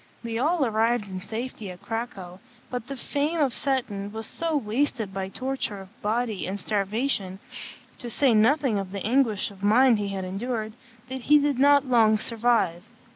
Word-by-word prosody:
They 230 -1 -3
all 310 +2 +2
arrived 225 0 +1
in 185 -1 -5
safety 220 +1 -5
at 180 -1 -10
Cracow; 200 -6 -5 0.3
but 245 -2 -4
the 275 - -5
frame 295 +6 -1
of 275 -5 +2
Seton 225 -8 -1
was 220 +1 -5
so 330 +3 -1
wasted 225 -3 -1
by 190 0 -3
torture 255 -2 -3
of 195 +4 -14
body 220 -1 -1
and 195 +2 -3
starvation, 205 -1 -1 0.6
to 240 - -6
say 255 +1 +3
nothing 230 +1 +3
of 190 -1 -5
the 200 - -4
anguish 225 -4 +2
of 195 -1 -15
mind 230 +3 +5
he 205 - -1
had 195 -1 -3
endured, 215 +3 -3 0.3
that 260 0 -5
he 300 - +9
did 285 -3 +1
not 285 0 +6
long 225 -4 +4
survive. 220 -6 +1
225 Hz, 175 wpm, -26 LUFS, 200-260 Hz, 0.6 s, he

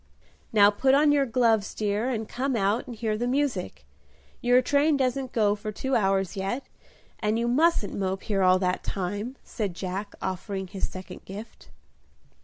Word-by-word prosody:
"Now 205 -2 +6
put 265 +6 +3
on 295 +1 +5
your 280 -2 +3
gloves, 225 -4 +2
dear, 210 +3 0
and 225 -4 -2
come 265 +1 -2
out 205 +2 +1
and 240 - -7
hear 220 -1 -1
the 240 +3 -1
music: 255 -8 -1 0.6
your 245 +1 +5
train 285 +3 +3
doesn't 260 -1 -1
go 210 -3 +3
for 210 +1 -5
two 265 +5 -2
hours 195 -2 +1
yet, 195 +7 -2 0.6
and 215 +1 0
you 235 +1 0
mustn't 280 -3 +2
mope 190 -1 -2
here 200 -2 0
all 185 0 +5
that 180 -1 -1
time," 205 +6 -3
said 200 -7 -4
Jack, 190 +3 -5
offering 190 +1 -3
his 190 +1 -4
second 185 0 -9
gift. 205 +4 -10
215 Hz, 170 wpm, -26 LUFS, 195-250 Hz, 0.6 s, Now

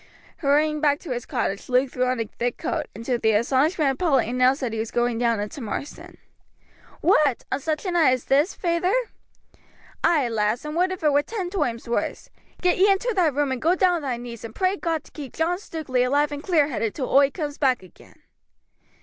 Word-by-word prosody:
Hurrying 300 +1 +2
back 290 -2 +3
to 325 - -7
his 245 -1 -4
cottage 200 +5 -3
Luke 255 +1 +2
threw 255 0 0
on 255 -1 0
a 225 - -1
thick 240 +3 -3
coat, - - -3
and 225 +2 -8
to 245 -2 0
the 220 -1 +2
astonishment 275 - +2
of 265 - -6
Polly 280 -10 +2
announced 255 +3 +3
that 245 -4 -2
he 225 - -3
was 225 0 -3
going 240 -1 0
down 235 -2 +1
into 210 +7 -5
Marsden. 240 +6 -6 0.8
"What! 305 - +3
on - - 0
such 310 +4 -3
a 370 - -1
night 325 -7 +4
as 255 - -3
this, 290 +7 +2
feyther?" 350 +3 0 1.1
"Ay, 300 -7 +3
lass, 225 +3 -1
and 300 +1 -5
would 365 +2 +2
if 370 -3 -6
it 300 -2 +3
were 285 - +4
ten 370 +1 -5
toimes 250 - -2
wurse. 235 - -3 0.3
Get 360 0 +2
ye 395 +2 +5
into 460 +5 0
thy 360 -4 +3
room, 290 -1 0
and 260 - -3
go 340 +3 +3
down 360 -1 +3
on - - -5
thy 260 -4 -2
knees, 235 -2 -9
and 230 -1 -8
pray 375 0 +1
God 330 -5 -2
to - - -19
keep 285 -4 -9
John 345 +3 0
Stukeley 300 -10 -2
alive 285 +4 +1
and 290 0 -5
clear 305 -4 +2
headed 225 -5 -2
till 265 - -3
oi 275 0 +5
coomes 295 -1 -5
back 260 -7 +2
again." 185 - -19
280 Hz, 220 wpm, -24 LUFS, 245-330 Hz, 1.1 s, ye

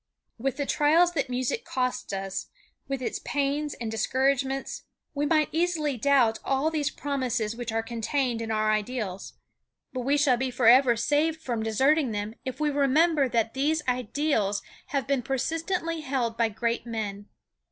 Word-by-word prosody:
" - - -53
With 270 0 0
the 285 - -1
trials 325 +6 +4
that 280 -6 -2
music 255 - -1
costs 255 - -2
us, 195 -1 -4 0.4
with 270 -1 -3
its - - -2
pains 290 +1 -1
and 230 -2 -5
discouragements, 265 +4 0 0.3
we 290 0 0
might 310 -1 +3
easily 320 -4 0
doubt 245 -3 +3
all 275 +4 +1
these 300 -3 0
promises 255 -6 -2
which 240 -1 -4
are 225 0 0
contained 235 +1 -1
in 225 - -4
our 215 -1 +1
ideals, 215 -3 -3 0.6
but 255 - -3
we 275 +4 +1
shall 280 -4 +3
be 260 +1 -1
forever 245 0 +5
saved 300 +7 +1
from 240 -7 -3
deserting 265 +4 +2
them 205 +1 -3
if 260 +1 -5
we 300 -1 +1
remember 285 +1 +3
that 230 -2 0
these 300 +3 +1
ideals 250 -4 0 0.2
have 275 -2 -1
been 275 -2 +1
persistently 330 +5 -2
held 260 -5 -1
by 230 -1 +2
great 235 +2 -2
men. 205 -3 -4
265 Hz, 165 wpm, -27 LUFS, 230-290 Hz, 0.6 s, forever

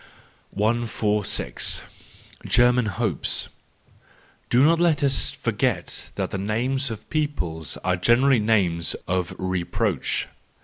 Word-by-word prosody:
146. 105 -1 0 0.6
German 120 -1 +4
Hopes 95 - -1 0.5
.— - - -32
Do 125 +3 +4
not 165 +2 +4
let 165 -4 +2
us 135 -1 +2
forget - - -2
that - - -3
the 95 - -3
names 125 +7 -1
of 110 -2 -8
peoples 90 - -2
are 90 0 +1
generally 120 +7 +4
names 95 -6 +1
of 90 -2 -1
reproach. 95 -2 -1
110 Hz, 105 wpm, -24 LUFS, 95-130 Hz, 0.6 s, German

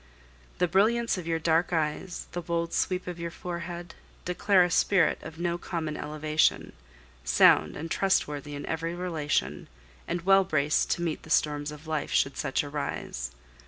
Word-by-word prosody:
The 180 - +2
brilliance 215 +4 +2
of 170 - -7
your 165 -1 +1
dark 165 +2 +1
eyes, 160 +2 -2
the 175 - -4
bold 170 0 -2
sweep 185 -1 0
of 180 -1 -6
your 170 0 -3
forehead, 175 0 -6 0.3
declare 185 +1 +3
a 175 - 0
spirit 180 -1 +3
of 160 - -9
no 170 0 -1
common 160 -4 -3
elevation, 155 +1 0 0.5
sound - - +5
and 160 +2 -6
trustworthy 150 -6 0
in 145 - -6
every 165 +1 -3
relation, 150 - -2 0.4
and 175 - -2
well 195 +1 +6
braced 155 -4 +1
to 170 - -4
meet 165 -2 -2
the - - -14
storms 150 -1 +1
of 150 +1 -11
life, 155 -2 -2
should 135 - +2
such 135 - -1
arise. 140 - -4
165 Hz, 160 wpm, -28 LUFS, 150-180 Hz, 0.5 s, well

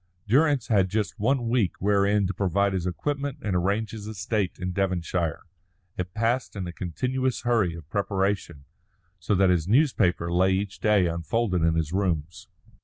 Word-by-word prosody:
Durrance 140 +2 +3
had 95 -4 +2
just 105 0 -2
one 120 +2 +1
week 115 -6 +1
wherein 100 +1 +2
to 95 - -2
provide 100 +1 +1
his 90 -1 -1
equipment 140 - -3
and 100 -4 -1
arrange 100 +5 0
his 105 -2 -8
estate 105 -2 -2
in 90 0 -3
Devonshire. 90 -4 -1 0.5
It 90 +1 -5
passed 115 +3 0
in 95 -3 -4
a 85 - -6
continuous 125 - -2
hurry 110 -9 +1
of 80 -3 -11
preparation, 95 -6 -2 0.5
so 95 +4 0
that 95 0 +4
his 85 -2 +1
newspaper 95 - +2
lay 95 +2 +3
each 100 +1 -3
day 105 -4 +3
unfolded 90 +3 -1
in 80 0 +2
his 80 0 -1
rooms. 90 0 -2
100 Hz, 165 wpm, -26 LUFS, 90-110 Hz, 0.5 s, that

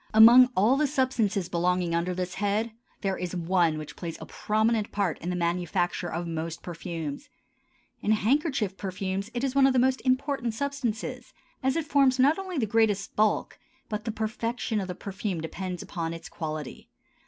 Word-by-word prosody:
Among 240 +3 +9
all 220 +8 +4
the 300 0 +2
substances 245 - 0
belonging 180 0 0
under 170 +2 0
this 180 0 -3
head, 210 +4 0 0.3
there 195 -2 -1
is 180 0 -4
one 170 -2 +2
which 150 -1 -7
plays 170 -2 -6
a - - -7
prominent 220 0 0
part 195 -6 -1
in 175 - -4
the 180 - -1
manufacture 175 +1 -1
of 170 +2 -3
most 165 0 -4
perfumes. 170 - -5 0.7
In 215 - +2
handkerchief 225 - +1
perfumes 190 +1 -3
it 240 - -2
is 270 -2 0
one 275 -1 +6
of 270 - +2
the - - +2
most 260 +1 +3
important 255 -3 0
substances, 250 -2 -3 0.3
as 265 0 +1
it 330 -2 -1
forms 275 -4 +3
not 285 +7 +4
only 375 -3 -5
the 240 - +2
greatest 215 -2 +1
bulk, 215 0 +1 0.3
but 210 0 -4
the 225 - -1
perfection 225 0 -2
of 190 - -4
the 180 - -5
perfume 195 -2 -4
depends 180 +3 -5
upon 165 -3 -4
its 165 - -9
quality. 155 -3 -6
205 Hz, 175 wpm, -27 LUFS, 175-250 Hz, 0.7 s, Among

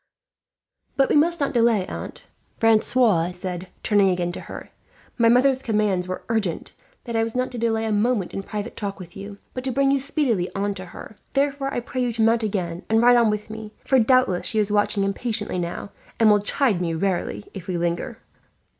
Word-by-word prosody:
"But 270 - +3
we - - +2
must 335 +3 +3
not 280 -1 0
delay, 230 -5 +3
aunt," - - -8 0.3
Francois 220 -5 +3
said, 180 0 -6 0.2
turning 205 -2 +4
again 175 -1 0
to - - -7
her. - - -9 0.5
"My 230 -1 +5
mother's 260 +2 +4
commands 210 -6 0
were 185 - -5
urgent, 215 -7 -2 0.3
that 235 - -5
I 225 - +3
was 225 +1 -2
not 255 0 -1
to 245 - -6
delay 225 -1 0
a 220 - -1
moment 210 -2 +1
in 195 - -3
private 205 +1 -6
talk 200 -2 -4
with 175 -3 -11
you, 200 +1 -8 0.2
but 255 - -5
to 265 - -2
bring 275 +1 +2
you 275 - +2
speedily 255 - 0
on 200 +1 -1
to 185 -1 -8
her; 205 +3 -11 0.2
therefore 275 0 0
I 245 - -2
pray 255 +1 -4
you 245 -1 0
to 225 - -2
mount 230 +1 +3
again 185 -5 -2
and 220 0 +4
ride 245 +1 +6
on 235 -2 +4
with 210 +1 -3
me, 220 -1 -8
for 265 - +4
doubtless 235 -6 +3
she 220 - 0
is 210 -1 +1
watching 205 0 +2
impatiently 205 -1 -2
now, 175 +3 -5 0.3
and 220 -2 +6
will 205 -1 +4
chide 210 -3 +1
me 165 -2 -1
rarely, 190 +3 -2
if 190 -3 -9
we 180 -2 -2
linger." 170 0 -2
215 Hz, 210 wpm, -23 LUFS, 195-245 Hz, 0.5 s, ride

